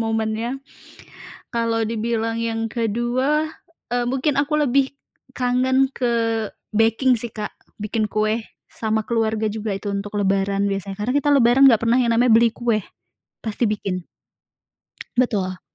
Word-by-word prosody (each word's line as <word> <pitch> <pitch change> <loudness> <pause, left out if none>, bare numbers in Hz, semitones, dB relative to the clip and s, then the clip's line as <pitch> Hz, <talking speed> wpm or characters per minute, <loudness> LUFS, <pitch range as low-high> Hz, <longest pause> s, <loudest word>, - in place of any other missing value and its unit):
momennya. 225 +2 -1 1.0
Kalau 230 -1 +1
dibilang 225 0 -1
yang 225 0 -1
kedua, 245 +7 0 0.5
eee, 245 0 +1
mungkin 270 +2 0
aku 295 +2 -1
lebih 270 +2 +2 0.4
kangen 260 +1 +2
ke 245 -2 0 0.6
baking 225 +4 +3
sih, 235 0 -5
Kak. 210 -1 -5 0.3
Bikin 215 0 -2
kue, 215 +1 0 0.3
sama 220 -1 -1
keluarga 220 -2 0
juga 215 -1 -3
itu 200 0 -4
untuk 205 +1 -3
Lebaran 195 0 +1
biasanya. 195 0 -4
Karena 215 +4 -1
kita 290 0 +1
Lebaran 260 +1 +6
nggak 225 -2 +3
pernah 235 +2 +4
yang 235 -2 +2
namanya 240 +1 +4
beli 230 +1 +5
kue, 235 -3 0 0.6
pasti 220 +2 -1
bikin. 195 -3 -2 1.1
Betul. 195 -7 0
225 Hz, 135 wpm, -22 LUFS, 215-245 Hz, 1.1 s, Lebaran